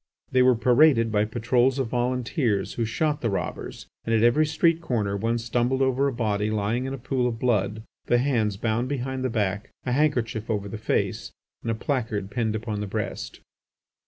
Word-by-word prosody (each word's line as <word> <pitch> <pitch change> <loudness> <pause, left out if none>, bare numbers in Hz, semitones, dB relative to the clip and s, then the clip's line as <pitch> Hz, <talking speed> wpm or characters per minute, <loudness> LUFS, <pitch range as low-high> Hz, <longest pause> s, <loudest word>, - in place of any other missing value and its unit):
The 130 - +4
were 125 0 +5
paraded 120 0 +4
by 105 0 +2
patrols 120 +4 +1
of 130 -4 -1
volunteers 120 -2 0
who 115 - -1
shot 150 +6 -1
the 115 - 0
robbers, 100 - -4 0.2
and 115 - +1
at 110 - +3
every 150 +7 +4
street 165 +2 +2
corner 110 -10 -1
one 115 +4 0
stumbled 120 +3 0
over 130 +1 +2
a - - 0
body 105 -4 -1
lying 110 +4 -1
in 135 - -3
a - - -8
pool 125 0 -1
of 115 -2 -3
blood, 110 -3 0 0.2
the 120 - +4
hands 115 -6 +1
bound 115 +4 -1
behind 130 -1 -3
the 130 - 0
back, 105 -2 -1 0.2
a 125 - -1
handkerchief 120 -6 0
over 105 -2 -1
the 105 +2 -6
face, - - -1 0.3
and 115 - -4
a 115 - +1
placard 110 -5 -2
pinned 110 -3 -1
upon 110 -1 -3
the 105 - -3
breast. - - -4
120 Hz, 190 wpm, -25 LUFS, 110-130 Hz, 0.3 s, were